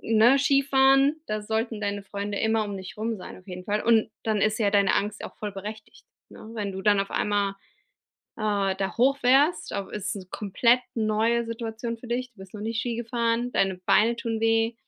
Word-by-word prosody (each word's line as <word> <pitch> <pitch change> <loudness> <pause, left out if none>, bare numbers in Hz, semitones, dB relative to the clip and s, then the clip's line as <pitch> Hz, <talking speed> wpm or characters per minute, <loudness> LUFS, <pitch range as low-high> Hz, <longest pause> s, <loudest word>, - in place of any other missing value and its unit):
ne, 230 +4 +4
Skifahren, 275 +1 +4
da 215 0 -2
sollten 220 +1 -2
deine 205 0 -2
Freunde 200 +1 -4
immer 220 -1 +1
um 205 -1 -5
dich 190 +2 -9
rum 220 +1 -2
sein, 185 - -10
auf 185 - -20
jeden 180 0 -7
Fall. 210 +1 -1
Und 225 -1 +3
dann 215 -2 0
ist 215 +1 +1
ja 205 -3 +2
deine 200 -1 +3
Angst 210 +1 -2
auch - - -8
voll 210 -2 -5
berechtigt, 210 +2 -9 0.2
ne? 220 - -12
Wenn 205 -3 -3
du 190 - -6
dann 205 -1 +4
auf 195 - -3
einmal, 205 -1 0 0.9
äh, 200 -3 0
da 195 +3 -3
hoch 270 +3 +4
fährst, 290 +6 +3
au 200 -1 -3
ist 210 +1 -4
'ne 190 - -8
komplett 235 +5 +2
neue 225 +1 +1
Situation 230 0 -5
für 240 - -12
dich, 250 +2 -3
du 200 - -24
bist 190 +1 -12
noch 210 - -7
nie 225 +2 -3
Ski 230 0 -2
gefahren, 235 +1 -1
deine 190 -1 +1
Beine 230 +3 +4
tun 225 -1 -3
weh, 225 +1 +2
220 Hz, 205 wpm, -26 LUFS, 205-235 Hz, 0.9 s, ne